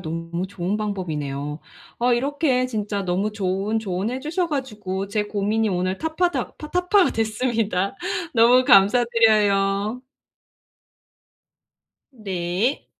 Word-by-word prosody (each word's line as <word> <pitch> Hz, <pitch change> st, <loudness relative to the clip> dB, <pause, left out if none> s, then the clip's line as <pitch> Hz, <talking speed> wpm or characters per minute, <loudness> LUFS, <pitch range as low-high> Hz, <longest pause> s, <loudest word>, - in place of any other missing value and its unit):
너무 165 Hz, +2 st, -4 dB
좋은 190 Hz, +1 st, -3 dB
방법이네요. 150 Hz, -8 st, -4 dB, 0.4 s
어 245 Hz, +1 st, +2 dB
이렇게 265 Hz, 0 st, +1 dB
진짜 210 Hz, -4 st, -3 dB
너무 190 Hz, +4 st, -1 dB
좋은 200 Hz, +2 st, -1 dB
조언해 210 Hz, +5 st, -3 dB
주셔 335 Hz, +5 st, -1 dB
가지고 210 Hz, -, -4 dB
제 210 Hz, +1 st, -1 dB
고민이 210 Hz, +2 st, 0 dB
오늘 185 Hz, 0 st, -1 dB
탑파닥 335 Hz, +3 st, -1 dB
파 300 Hz, -, -9 dB
타파가 360 Hz, +1 st, +3 dB
됐습니다. 220 Hz, -3 st, -1 dB, 0.4 s
너무 245 Hz, +2 st, +5 dB
감사드려요. 210 Hz, -1 st, +3 dB, 2.1 s
네. 195 Hz, +2 st, -2 dB
210 Hz, 240 characters per minute, -23 LUFS, 190-250 Hz, 2.1 s, 너무